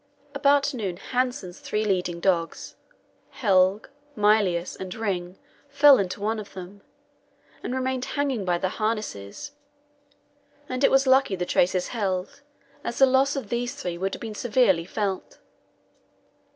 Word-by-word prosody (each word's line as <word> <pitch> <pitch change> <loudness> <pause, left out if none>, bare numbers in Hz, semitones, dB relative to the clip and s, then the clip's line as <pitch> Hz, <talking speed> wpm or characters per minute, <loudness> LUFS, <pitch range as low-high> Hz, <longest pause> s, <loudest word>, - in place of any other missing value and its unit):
About 280 0 +3
noon 200 -8 -3
Hanssen's 245 -7 -2
three 215 +1 -2
leading 180 -4 -1
dogs, 170 -2 -1 0.5
Helge, 195 -2 +2 0.3
Mylius, 205 -5 +2
and 185 -1 -7
Ring, 185 -4 -3 0.3
fell 280 -2 +7
into 185 0 -2
one 215 +2 -1
of 205 - -9
them, 190 +2 -9 0.8
and 250 - -4
remained 260 0 -1
hanging 275 -7 0
by 175 -2 +1
their 185 +1 -2
harness; 215 - -4 1.2
and 255 +1 -3
it - - +6
was 270 +1 +4
lucky 260 -6 +4
the 180 -1 -3
traces 180 +1 +1
held, 195 +1 -3 0.4
as 235 - -4
the 270 - +7
loss 265 +2 +2
of 260 -7 -5
these 240 +2 -2
three 180 -11 -4
would 190 +3 -2
have - - -12
been 225 -2 -5
severely 210 -7 +2
felt. 195 -1 -3
210 Hz, 140 wpm, -25 LUFS, 185-255 Hz, 1.2 s, fell